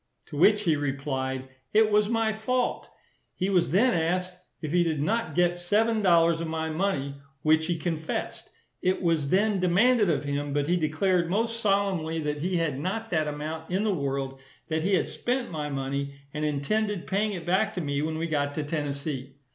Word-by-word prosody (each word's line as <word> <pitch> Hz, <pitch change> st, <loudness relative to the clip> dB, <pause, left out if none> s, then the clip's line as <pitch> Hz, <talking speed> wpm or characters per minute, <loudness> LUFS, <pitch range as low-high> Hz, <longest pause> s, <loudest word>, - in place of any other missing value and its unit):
To -, -, -8 dB
which 205 Hz, +7 st, +5 dB
he 165 Hz, -5 st, +3 dB
replied, 135 Hz, -2 st, -2 dB, 0.3 s
it 215 Hz, 0 st, +5 dB
was 210 Hz, 0 st, +3 dB
my 225 Hz, -1 st, +1 dB
fault. 245 Hz, +3 st, -1 dB, 0.5 s
He 190 Hz, +2 st, -1 dB
was 180 Hz, -7 st, +3 dB
then 215 Hz, -, +4 dB
asked, 180 Hz, +2 st, 0 dB, 0.3 s
if 155 Hz, -3 st, -4 dB
he 175 Hz, +1 st, +4 dB
did 160 Hz, -3 st, -1 dB
not 225 Hz, +10 st, -1 dB
get 175 Hz, 0 st, +2 dB
seven 215 Hz, +5 st, +2 dB
dollars 170 Hz, -3 st, +4 dB
of 165 Hz, -, -3 dB
my 160 Hz, 0 st, -2 dB
money, 150 Hz, -6 st, -1 dB, 0.3 s
which 155 Hz, +1 st, +3 dB
he 175 Hz, -1 st, 0 dB
confessed. 160 Hz, -1 st, -3 dB, 0.3 s
It 185 Hz, +1 st, 0 dB
was 160 Hz, -5 st, +1 dB
then 200 Hz, +2 st, +2 dB
demanded 205 Hz, +4 st, +4 dB
of 145 Hz, -3 st, +1 dB
him; 145 Hz, 0 st, -2 dB
but 145 Hz, 0 st, +1 dB
he 175 Hz, -, +3 dB
declared 170 Hz, +2 st, +1 dB
most 230 Hz, +4 st, 0 dB
solemnly, 195 Hz, -6 st, +1 dB
that 150 Hz, -1 st, -2 dB
he 180 Hz, +2 st, 0 dB
had 155 Hz, -5 st, -1 dB
not 220 Hz, +8 st, -3 dB
that 155 Hz, -3 st, +1 dB
amount 155 Hz, +2 st, -5 dB
in 190 Hz, +3 st, 0 dB
the 215 Hz, -2 st, +1 dB
world; 135 Hz, -3 st, -2 dB, 0.3 s
that 160 Hz, 0 st, 0 dB
he 195 Hz, +4 st, +2 dB
had -, -, +1 dB
spent 245 Hz, -2 st, -2 dB
my 150 Hz, -2 st, -3 dB
money, 140 Hz, 0 st, -3 dB, 0.2 s
and 150 Hz, 0 st, -3 dB
intended 185 Hz, +7 st, -1 dB
paying 205 Hz, +2 st, 0 dB
it 175 Hz, -3 st, -6 dB
back 195 Hz, +4 st, +2 dB
to 180 Hz, -, -2 dB
me 145 Hz, -2 st, -1 dB
when 155 Hz, +1 st, -2 dB
we 165 Hz, -, -1 dB
got 145 Hz, -3 st, -1 dB
to 155 Hz, -, -1 dB
Tennessee. 140 Hz, -3 st, -4 dB
165 Hz, 195 wpm, -27 LUFS, 150-195 Hz, 0.5 s, which